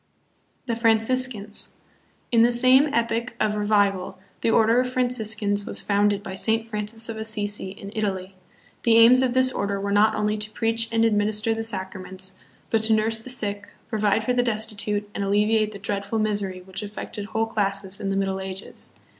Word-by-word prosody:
The 235 -3 -2
Franciscans. 225 -1 +1 0.6
In 230 -1 +4
the 235 +1 +5
same 255 +4 +6
epoch 235 0 -1
of 210 -1 +1
revival, 200 -3 +1 0.2
the - - +1
Order 225 +1 +4
of 250 0 0
Franciscans 220 -5 0
was - - -3
founded 205 0 +1
by 195 - -6
Saint 225 +3 0
Francis 225 +1 -3
of 225 -1 -5
Assisi 210 -3 -1
in 195 +1 -10
Italy. 195 -3 -3 0.5
The 230 -1 +4
aims 240 +3 +7
of 255 -1 0
this 260 0 +4
order 200 -4 -2
were 200 0 -3
not 210 +2 +4
only 210 0 -1
to 210 0 -3
preach 225 +1 -1
and 225 0 +2
administer 215 0 +1
the 225 - -3
sacraments, 190 -3 -5 0.4
but 225 - +2
to 220 - +3
nurse 220 +1 +1
the 225 - -10
sick, 205 -4 -3 0.2
provide 215 -1 +1
for 250 - 0
the 245 - +2
destitute, 215 -3 -2
and 200 - -3
alleviate 210 +2 +2
the 205 - -8
dreadful 200 +2 -3
misery 205 -4 -2
which 190 +1 -7
affected 210 0 -6
whole 220 +1 -1
classes 200 -3 -2
in 195 - -2
the 195 - -1
Middle 195 -1 -1
Ages. 190 0 -7
215 Hz, 180 wpm, -24 LUFS, 200-225 Hz, 0.6 s, aims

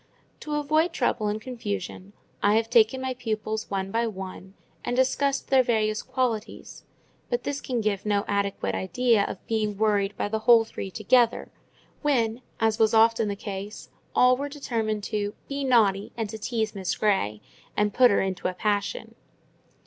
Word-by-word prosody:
To 300 -1 -4
avoid 310 +3 +1
trouble 240 -4 0
and 210 +1 -1
confusion, 205 -5 -5 0.3
I 205 +1 +4
have 225 +1 +1
taken 240 +2 +4
my 260 0 -1
pupils 220 -3 -3
one 195 -1 -2
by 230 +2 +1
one, 190 -1 -8 0.3
and 245 - -2
discussed 270 +2 +1
their 265 -1 +6
various 215 -3 0
qualities; 240 -4 -3 0.4
but 485 0 -1
this 285 0 -3
can 245 -3 -2
give 205 -2 -1
no 205 -1 0
adequate 200 - -1
idea 210 - +2
of - - -6
being 215 -2 -1
worried 205 -2 +1
by - - -1
the 220 +1 -2
whole 230 +1 +6
three 195 -3 -6
together; 230 +5 +2 0.5
when, 240 -5 +1 0.2
as 225 0 +1
was 220 0 +4
often 225 0 +4
the 200 - -2
case, 200 +1 -7 0.3
all 250 0 +6
were 285 +2 -4
determined 225 -7 -2
to 205 -1 -2
"be 280 0 -3
naughty, 210 -6 +3
and 220 -3 -3
to 220 - -7
tease 220 -1 -2
Miss 190 -3 -2
Grey, 110 - +1 0.4
and 210 -1 +1
put 250 -1 +6
her - - +3
in 190 -1 -1
a 185 - 0
passion." 210 - -2
220 Hz, 170 wpm, -26 LUFS, 205-245 Hz, 0.5 s, their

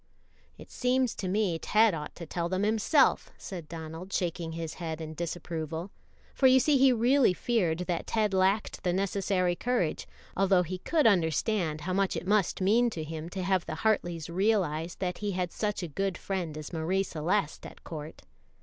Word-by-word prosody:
"It - - -13
seems 250 -1 +1
to 190 - -5
me 185 -3 0
Ted 215 +2 +4
ought 150 -2 -6
to 170 - -8
tell 170 +1 -3
them 185 +2 0
himself," 225 +7 +3
said 175 -5 -8
Donald, 165 +3 -7
shaking 170 -3 -2
his 165 -1 -5
head 160 -1 -4
in 160 -1 -6
disapproval; 165 +1 -4 0.4
for 265 - +4
you 260 0 +6
see 280 +1 +3
he 265 0 +6
really 245 -3 +3
feared 180 -9 0
that 175 -2 -2
Ted 215 -3 +1
lacked 190 +3 +1
the 180 - 0
necessary 190 -1 0
courage, 240 -7 -1 0.3
although 190 -1 +3
he 180 +2 -5
could 315 - +1
understand 170 -3 +2
how 185 +4 -3
much 195 -1 +1
it 165 - -5
must 200 -1 +1
mean 230 +6 +4
to 165 -8 -5
him 160 +1 -6
to 185 0 -4
have 185 -1 +1
the 155 - -3
Hartleys 175 -7 +1
realize 175 -3 0
that 180 -2 -3
he 205 -1 -2
had 180 -1 -2
such 210 -3 -2
a - - -3
good 190 +4 -2
friend 175 -6 -4
as 155 +2 -8
Marie 175 +4 0
Celeste 170 0 -2
at - - -15
court. 155 -1 -8
185 Hz, 185 wpm, -29 LUFS, 165-210 Hz, 0.4 s, you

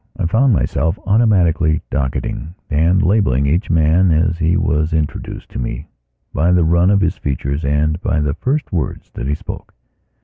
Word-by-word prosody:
I - - -2
found 125 +9 +3
myself 80 -5 0
automatically 95 -7 +2
docketing 70 +4 -3 0.2
and 85 +6 +2
labelling 90 - +2
each 85 +9 0
man 80 +3 +3
as 85 +2 +1
he 85 +1 +2
was 80 +1 0
introduced 80 -2 -3
to - - -7
me, - - -5 0.5
by 85 +5 +2
the 90 -1 +3
run 85 +3 +3
of 100 -1 +3
his 85 -3 0
features 70 +2 -3
and 75 +4 0
by 75 - 0
the 75 -1 0
first 135 - -2
words 85 - -3
that 65 - -5
he 75 - 0
spoke. - - -9
80 Hz, 170 wpm, -17 LUFS, 75-90 Hz, 0.5 s, found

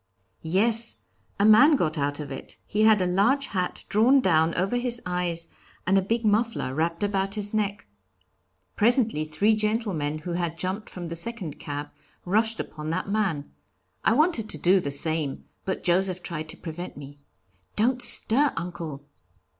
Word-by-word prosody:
"Yes. 220 +7 +2 0.4
A 200 - +3
man 255 +9 +7
got 160 - 0
out 145 0 -2
of 145 -2 -6
it 135 - -8
he 210 - -1
had 215 -3 +5
a - - 0
large 230 +10 +2
hat 185 -2 -3
drawn 240 +7 +4
down 165 -7 +2
over 195 +6 0
his 245 -1 +2
eyes 175 -2 -2 0.4
and 190 - +2
a 195 - +4
big 225 +4 -1
muffler 215 - 0
wrapped 165 +5 -1
about 195 0 -1
his 205 0 -3
neck. 205 - -1 0.9
Presently 225 - +2
three 175 +8 +2
gentlemen, 210 -9 -1
who 160 +3 -6
had 170 -1 -2
jumped 185 +5 -4
from 175 -2 -7
the 170 - -5
second 190 -4 -2
cab, 145 0 -6 0.3
rushed 220 +4 +1
upon 155 0 -6
that 185 +4 -2
man. 195 -9 -1 0.5
I 220 - +4
wanted 275 -6 +1
to - - -4
do 185 +2 +4
the 145 - -3
same, 150 0 +1 0.2
but 190 - -3
Joseph 185 +1 +1
tried 155 -2 -5
to - - -7
prevent 175 0 -7
me. 145 0 -11 0.6
'Don't 245 +4 +1
stir, 275 +6 +3
uncle!' 165 -5 -6
185 Hz, 165 wpm, -25 LUFS, 160-220 Hz, 0.9 s, man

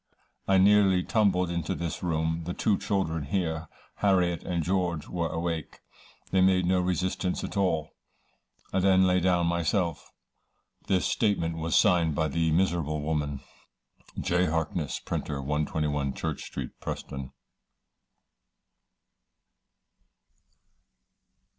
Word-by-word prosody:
I 95 - +4
nearly 95 -1 +5
tumbled 95 -5 +2
into 85 -3 -2
this 85 -2 -4
room. 80 -1 -1
The 90 - -4
two 105 - +2
children 90 -6 -1
here, 80 -1 -2 0.3
Harriet 90 -4 +2
and 85 -2 -2
George 90 -3 -1
were 85 -2 -2
awake. 80 -2 -3 0.5
They 95 - +3
made 95 -1 +4
no 90 +1 +2
resistance 90 0 -1
at - - -5
all. 80 -6 0 0.8
I - - +2
then 95 0 +4
lay 90 0 +3
down 90 -1 +2
myself." 85 0 -1 0.8
This 95 -2 +2
statement 85 -7 0
was 80 0 -1
signed 85 -4 +4
by 80 +1 +1
the 80 +3 +1
miserable 80 -3 +1
woman. 75 -3 -2 0.8
J. 90 +1 +1
HARKNESS, 80 -1 -2
Printer, 70 -2 -3
121, 75 0 -1
Church 80 -3 -4
Street, 65 -3 -6
Preston. 70 -1 -6
85 Hz, 115 wpm, -28 LUFS, 80-95 Hz, 0.8 s, nearly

